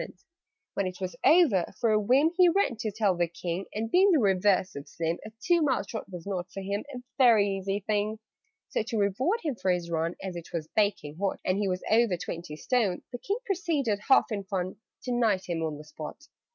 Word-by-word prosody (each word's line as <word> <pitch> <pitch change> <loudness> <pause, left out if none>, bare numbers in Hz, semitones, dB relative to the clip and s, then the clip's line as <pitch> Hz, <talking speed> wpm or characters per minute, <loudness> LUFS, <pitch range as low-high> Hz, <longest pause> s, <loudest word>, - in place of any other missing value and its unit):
"When 200 - -1
it 180 -1 -7
was 185 +3 -4
over, 295 - +4
for 230 -3 +2
a 215 - +4
whim, 260 +9 +3
He 365 -1 +6
ran 340 -8 +1
to 220 -1 -3
tell 205 -3 +1
the 175 0 +1
King; 175 +2 -4
And 225 +2 -3
being 380 +3 +5
the 345 - +5
reverse 195 -4 +2
of 140 0 -7
slim, 165 +1 -2
A 215 - -9
two 345 -1 +4
mile 260 -9 +1
trot 220 -1 -6
was 175 -2 -8
not 185 -3 -4
for 195 - -6
him 200 +2 -3
A 250 -2 -7 0.2
very 230 -6 +6
easy 195 +1 -2
thing. 210 +1 -1 0.5
"So, - - 0
to 225 +1 -3
reward 255 - +1
him 300 -4 -1
for 190 -5 -2
his 175 -2 0
run 165 +1 -1
(As 190 -2 -5
it 170 -1 -8
was 160 -2 -3
baking 200 -8 0
hot, 195 -1 -1
And 185 +2 +1
he 205 - 0
was 185 -1 -2
over 220 -5 +4
twenty 170 -2 -6
stone), 205 0 0
The 245 - -6
King 400 - -2
proceeded, 325 - 0
half 265 - +5
in 200 -2 -2
fun, 190 0 -3 0.3
To 250 - -3
knight 225 -6 +1
him 170 -2 -2
on 155 -2 -2
the 150 - -10
spot." 155 - -9
200 Hz, 220 wpm, -28 LUFS, 180-245 Hz, 0.5 s, He